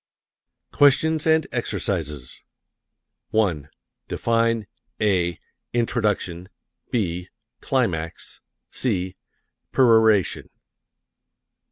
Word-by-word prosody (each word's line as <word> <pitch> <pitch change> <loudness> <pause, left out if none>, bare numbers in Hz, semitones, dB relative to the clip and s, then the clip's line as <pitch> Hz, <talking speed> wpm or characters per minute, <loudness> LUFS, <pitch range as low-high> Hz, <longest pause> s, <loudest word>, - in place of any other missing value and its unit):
QUESTIONS 155 +3 +4
AND 160 -1 +4
EXERCISES 80 - -3 0.9
1. 85 -10 0 0.4
Define 115 -1 +1 0.3
(a) 90 -5 +1 0.4
introduction; 105 -7 -1 0.4
(b) 90 -6 -2 0.3
climax; 85 -12 -2 0.3
(c) 95 -7 -1 0.6
peroration. 110 -6 +4
105 Hz, 55 wpm, -23 LUFS, 90-120 Hz, 0.9 s, QUESTIONS